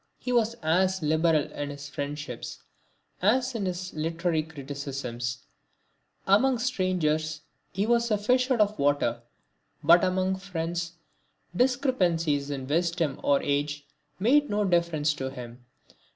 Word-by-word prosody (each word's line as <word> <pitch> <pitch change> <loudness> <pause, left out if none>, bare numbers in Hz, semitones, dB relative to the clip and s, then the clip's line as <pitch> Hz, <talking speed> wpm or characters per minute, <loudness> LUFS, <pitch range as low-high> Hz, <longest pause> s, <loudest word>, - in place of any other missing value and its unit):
He 250 - -4
was 230 -1 +2
as 185 +3 +2
liberal 155 0 +2
in 145 0 -4
his 145 0 -7
friendships 145 -3 -6 0.6
as 250 +6 +2
in 210 -5 -2
his 180 0 -4
literary 165 +1 0
criticisms. 135 -5 -5 0.8
Among 240 +7 +4
strangers 170 -10 0 0.3
he 195 +3 -1
was 235 0 +2
as 210 - +2
a - - -12
fish 250 +3 +3
out 245 -4 +3
of 210 0 +1
water, 140 -5 +1 0.6
but 170 +1 +6
among 185 +1 +1
friends 170 -2 -4 0.6
discrepancies 180 - +1
in 135 -2 -4
wisdom 165 0 0
or 140 -1 +2
age 145 +1 -1 0.3
made 280 +9 +3
no 210 0 +1
difference 170 -4 +2
to 130 -2 -4
him. 120 -2 -10
170 Hz, 130 wpm, -27 LUFS, 145-200 Hz, 0.8 s, but